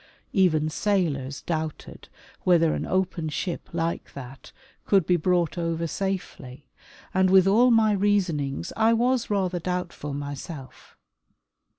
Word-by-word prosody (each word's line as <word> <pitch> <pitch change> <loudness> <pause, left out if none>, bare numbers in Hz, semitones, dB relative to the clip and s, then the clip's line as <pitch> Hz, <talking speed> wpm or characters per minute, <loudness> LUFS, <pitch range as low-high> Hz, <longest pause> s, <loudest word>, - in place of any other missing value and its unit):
Even 160 -6 +3
sailors 155 -7 -1
doubted 160 -2 -5 0.3
whether 165 -3 +4
an - - -3
open 185 -4 -1
ship 170 +3 -4
like 165 0 -3
that 135 -1 -10 0.3
could 195 -5 +3
be 180 - +3
brought 175 0 +1
over 165 0 -1
safely, 165 -8 -5 0.5
and 190 0 +3
with 190 -1 +6
all 225 +6 +5
my 225 -2 +4
reasonings 185 -8 0
I 225 +1 +4
was 245 +1 +1
rather 190 -3 0
doubtful 175 -5 -4
myself. 145 0 -8
175 Hz, 120 wpm, -25 LUFS, 155-195 Hz, 0.5 s, with